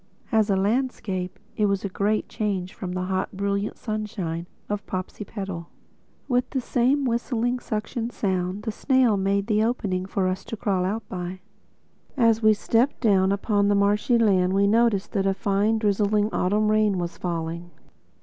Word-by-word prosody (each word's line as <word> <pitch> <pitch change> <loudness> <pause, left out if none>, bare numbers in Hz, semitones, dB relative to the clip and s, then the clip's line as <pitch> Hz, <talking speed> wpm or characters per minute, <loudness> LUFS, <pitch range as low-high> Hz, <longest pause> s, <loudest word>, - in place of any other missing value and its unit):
As 220 -2 +3
a 195 - +3
landscape, 200 -3 -1 0.2
it 210 -2 +2
was 200 0 0
a - - +1
great 205 +3 0
change 190 -4 -2
from 180 -1 -5
the 185 0 -2
hot 190 +1 -2
brilliant 200 +1 -1
sunshine 200 -6 -4 0.2
of 205 0 -3
Popsipetel. 190 -2 -5 0.6
With 250 -1 +1
the 265 - -1
same 260 +3 +1
whistling 245 0 0
suction 225 +1 -3
sound, 190 -2 -2
the 220 - -2
snail 260 -1 +3
made 200 +1 +1
the 215 -1 +2
opening 195 -6 -1
for 190 -1 0
us 185 +1 -2
to 225 - -6
crawl 190 -3 0
out 210 +3 -3
by. 180 0 -5 0.8
As 230 -3 +4
we 215 -1 +5
stepped 235 +6 +1
down 195 -4 +3
upon 200 0 +1
the 205 - +3
marshy 205 +4 +3
land 190 -5 +3
we 200 +1 +3
noticed 220 -1 +2
that 195 -3 0
a 195 - +1
fine, 205 +3 +1
drizzling 210 0 +1
autumn 210 +3 +2
rain 215 -2 +3
was 175 -1 -4
falling. 170 0 -3
205 Hz, 165 wpm, -25 LUFS, 190-220 Hz, 0.8 s, we